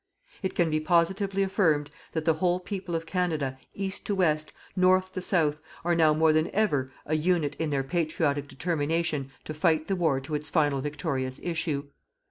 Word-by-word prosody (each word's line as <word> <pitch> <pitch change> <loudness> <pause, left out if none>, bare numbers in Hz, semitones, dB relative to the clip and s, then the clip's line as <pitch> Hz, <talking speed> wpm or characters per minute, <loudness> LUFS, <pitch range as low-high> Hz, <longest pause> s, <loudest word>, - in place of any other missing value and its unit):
It 190 - -2
can 170 -3 +2
be 155 - +2
positively 190 +4 +2
affirmed 160 -7 +2 0.2
that 160 -1 -2
the 165 - +5
whole 175 +3 +1
people 185 -2 -4
of 165 0 -2
Canada, 160 -8 -1 0.2
east 195 -1 -4
to 205 - +1
west, 155 -5 +1 0.2
north 185 0 +3
to 185 - -3
south, 155 -5 +1 0.2
are 175 - +3
now 160 -2 +5
more 155 +1 +4
than 155 +1 +2
ever 145 -12 +1
a 155 - 0
unit 155 -2 +1
in 160 -1 0
their 140 -2 0
patriotic 150 -2 0
determination 155 -1 -1
to 155 - -5
fight 155 0 +2
the 195 - +1
war 160 -7 +2
to 140 +4 -7
its 150 +1 -2
final 145 -4 +2
victorious 140 -3 -3
issue. 160 -4 -1
160 Hz, 180 wpm, -28 LUFS, 150-180 Hz, 0.2 s, the